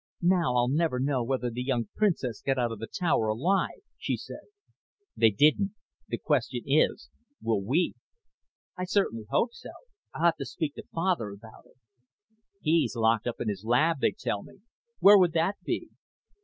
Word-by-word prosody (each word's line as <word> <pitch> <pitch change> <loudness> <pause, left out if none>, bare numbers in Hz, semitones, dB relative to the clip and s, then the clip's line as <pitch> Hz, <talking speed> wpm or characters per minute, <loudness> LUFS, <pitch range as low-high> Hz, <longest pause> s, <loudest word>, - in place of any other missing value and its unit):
"Now 175 -8 +3
I'll 120 0 +3
never 145 -1 +1
know 135 -2 0
whether 125 0 -1
the 120 +2 -4
young 125 -4 -1
princes 150 - 0
got 135 -1 0
out 120 -2 0
of 115 - -6
the 115 - -5
tower 150 - 0
alive," 180 - 0 0.2
she - - -1
said. - - -9 0.7
"They 115 - +5
didn't. 155 - +3 0.3
The - - -3
question - - -1
is, - - +1 0.3
will 110 -3 0
we?" 145 - +1 0.8
"I 180 - -3
certainly 145 - 0
hope 235 - +1
so. - - -11 0.5
I'll 165 - 0
have 170 -1 +4
to - - -5
speak 155 -4 -3
to - - -9
Father 165 - 0
about 105 +3 -13
it." - - -26 0.9
"He's 160 -3 +2
locked 115 0 +2
up 120 - -3
in - - -3
his 100 -1 -3
lab, 140 +7 +2
they - - +3
tell 100 - -2
me. 190 - -16 0.4
Where 200 0 +8
would 175 -3 +3
that 170 +5 +1
be?" - - -3
135 Hz, 175 wpm, -28 LUFS, 115-170 Hz, 0.9 s, Where